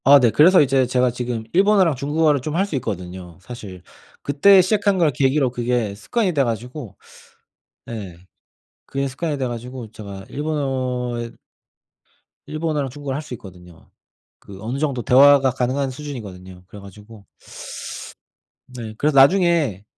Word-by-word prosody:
아 140 +2 +8
네 120 -4 +3
그래서 170 - +6
이제 135 -2 +2
제가 125 0 +2
지금 120 -2 -4
일본어랑 190 -4 +4
중국어를 145 +1 +1
좀 155 +4 -4
할 190 +3 +2
수 200 - -5
있거든요 90 -6 -6
사실. 95 -5 -10 0.4
그때 185 +8 +5
시작한 200 +1 +1
걸 165 -4 +3
계기로 135 0 +1
그게 120 -3 -1
습관이 190 - -1
돼 140 -3 +2
가지고 120 -1 -5 0.9
네 100 -7 -7 0.7
그게 135 0 -2
습관이 145 +3 -3
돼 130 - -1
가지고 120 -1 -7
제가 100 -3 -9
일본어에 130 -5 -3 1.2
일본어랑 155 -2 -2
중국어를 140 0 -5
할 145 - -3
수 150 - -9
있거든요. 90 -5 -15 0.5
그 95 -1 -13
어느정도 130 +2 -2
대화가 135 +1 +6
가능한 130 +2 -1
수준이거든요. 100 -10 -9
그래 105 - -12
가지고 105 +2 -14 1.4
네 120 -4 -8
그래서 150 +3 +1
나중에 150 - +4
130 Hz, 315 characters per minute, -21 LUFS, 110-150 Hz, 1.4 s, 아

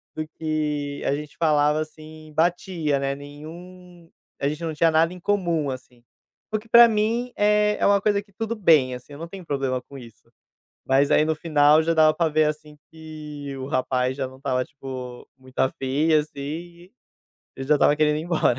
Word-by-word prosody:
do 155 - -3
que 150 -2 -2
a - - +1
gente 150 0 -8
falava, 150 -1 +2
assim, 155 0 -10
batia, 165 -3 0
né, 135 0 -1
nenhum 170 +4 -12 0.3
a 140 - 0
gente 150 +3 -4
não 160 -1 -2
tinha 165 +2 +3
nada 160 +2 +3
em 180 - -10
comum, 170 -6 0
assim, 125 -2 -10 0.5
o 215 - +1
que, 225 +2 -19
pra 235 +1 +9
mim, 230 +3 -1
eh, 210 0 +2
é - - +1
uma 200 0 +4
coisa 205 0 +1
que 200 0 -24
tudo 225 +3 -3
bem, 155 - +4
assim, 125 +3 -12
eu 145 - -10
não 165 - -6
tenho 185 +1 -10
problema 135 -4 -2
com 140 +2 -13
isso. 115 -2 -14 0.6
Mas 135 +1 +3
aí 150 - +4
no 160 0 0
final, 150 -1 +4
já 165 +1 +1
dava 155 -1 +5
pra 165 0 +1
ver 155 0 +2
assim 150 0 -4
que 150 -3 -8
o 130 - -5
rapaz 130 -2 -1
já 135 -2 -2
não 130 - -14
estava 130 -2 -1
tipo, 130 -3 -9
muito 130 0 -17
afim, 135 +4 +1
assim, 150 0 +2
e 170 +6 -7 0.6
ele 135 - -6
já 150 - +5
estava 145 0 +3
querendo 150 0 +2
ir - - -4
embora. 165 -7 +1
155 Hz, 195 wpm, -24 LUFS, 140-170 Hz, 0.6 s, pra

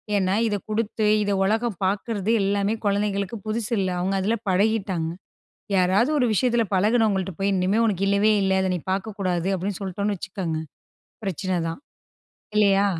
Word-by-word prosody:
ஏன்னா 190 -1 +2
இதை 205 -2 0
குடுத்து, 215 0 -1 0.2
இதை 205 0 0
உலகம் 220 0 0
பார்க்கிறது 205 +2 -1
எல்லாமே 200 +2 +1
குழந்தைகளுக்கு 200 +1 0
புதுசு 215 +1 -2
இல்ல, 185 -1 0
அவங்க 190 +2 0
அதில 220 +4 +1
பழகிட்டாங்க. 190 -4 +1 0.7
யாராவது 190 +8 +3
ஒரு 250 - +3
விஷயத்தில 240 +1 +2
பழகினவங்கள்ட்ட 200 -2 +2
போய், 200 +1 +1
"இனிமேல் 195 +5 +2
உனக்கு 195 -2 0
இல்லவே 200 +2 +3
இல்ல, 190 0 +2
அதை 190 - 0
நீ 175 - -3
பார்க்கக்கூடாது." 190 -3 -2
அப்படின்னு 190 +2 -3
சொல்லிட்டோம்ன்னு 200 +1 -2
வச்சுக்கோங்க, 175 -4 -4 0.7
பிரச்சனை 185 -1 -1
தான். 165 - -6 0.8
இல்லையா? 200 -1 +4
200 Hz, 145 wpm, -24 LUFS, 190-215 Hz, 0.8 s, இல்லையா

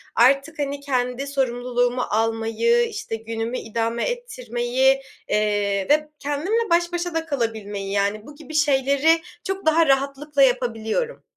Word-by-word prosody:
artık 275 +6 +3
hani 285 0 -2
kendi 255 -1 -1
sorumluluğumu 245 -2 0
almayı, 225 - +1
işte 440 - -5
günümü 225 +2 -4
idame 230 +1 -2
ettirmeyi, 265 - 0 0.3
eee, 205 -2 +1
ve 300 +1 +3
kendimle 355 +11 -1
baş 345 +1 +2
başa 350 0 -2
da 325 0 -1
kalabilmeyi, 220 -8 -3
yani, 200 +2 0
bu 295 - -11
gibi 315 +1 -11
şeyleri 290 +2 +3 0.2
çok 385 -1 -4
daha 315 0 +4
rahatlıkla 275 +1 +2
yapabiliyorum. 245 - 0
270 Hz, 125 wpm, -23 LUFS, 225-310 Hz, 0.3 s, daha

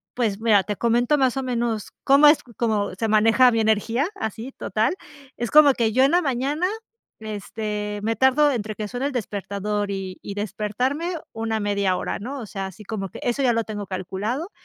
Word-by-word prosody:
pues, 220 -5 0
mira, 220 -3 +4
te 210 +2 -4
comento 240 +6 +2
más 265 -2 +2
o - - 0
menos 235 -4 -2
cómo 280 +2 +6
es 295 +1 +5
como 215 -5 0
se 205 +5 -2
maneja 225 +4 +5
mi 230 - +1
energía 220 +6 +1
así 225 - -5
total. 220 +4 -1 0.4
Es 240 -1 -2
como 295 -2 +7
que, 230 -3 +1
yo 260 +4 +4
en 275 - +4
la 350 +1 +4
mañana, 280 +5 0 0.5
este, 210 -1 -4
me 225 +1 0
tardo 275 +4 +4
entre 215 -4 -3
que 210 0 -4
suena 245 +5 -2
el - - -3
despertador 205 -3 -3
y 190 -2 -5
y 200 - -7
despertarme 220 - -2 0.2
una 225 0 -2
1/2 200 -2 +1
hora, - - -3
¿no? 265 +7 -6
O - - -6
sea, 195 -1 -5
así 190 +3 -11
como 195 -2 -4
que - - -10
eso 245 +3 0
ya 250 -3 +3
lo 230 0 0
tengo 205 -2 -6
calculado. 200 - -4
225 Hz, 195 wpm, -23 LUFS, 205-260 Hz, 0.5 s, como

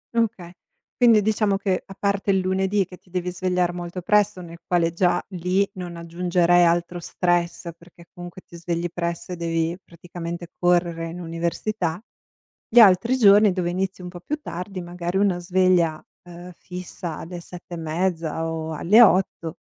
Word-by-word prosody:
Okay. 205 -7 -1 0.4
Quindi 230 -4 +5
diciamo 215 -2 +1
che, 195 -2 -1
a 195 - -12
parte 200 0 -1
il 195 - +4
lunedì 190 +1 +1
che 180 - -13
ti 180 - -28
devi 180 0 -3
svegliare 180 -1 0
molto 175 +1 -6
presto, 205 -1 +2
nel 170 -1 -11
quale 170 -2 +1
già 175 +1 +2
lì 185 +2 0
non 180 -2 -7
aggiungerei 175 +1 +2
altro 175 +1 0
stress 175 0 -1
perché 170 0 -18
comunque 175 +1 -10
ti - - -14
svegli 170 0 -3
presto 170 0 -4
e - - -3
devi 165 0 -1
praticamente 170 0 -8
correre 175 -2 +1
in 175 +2 -8
università, 170 +1 -3 0.7
gli 240 - +6
altri 220 +4 +6
giorni 205 -2 +6
dove 180 -2 -1
inizi 185 +1 -3
un 180 - -7
po' 175 -1 -10
più 300 +11 -3
tardi, 185 - -6
magari 175 +1 -4
una 195 -3 +2
sveglia, 175 -3 +2 0.2
uhm, 175 0 -11
fissa 180 -2 -7
alle 175 +1 -8
7 175 0 -11
e - - -4
mezza 165 0 -2
o 160 0 -4
alle 205 +9 +5
8 180 -5 +3
175 Hz, 165 wpm, -23 LUFS, 170-190 Hz, 0.7 s, gli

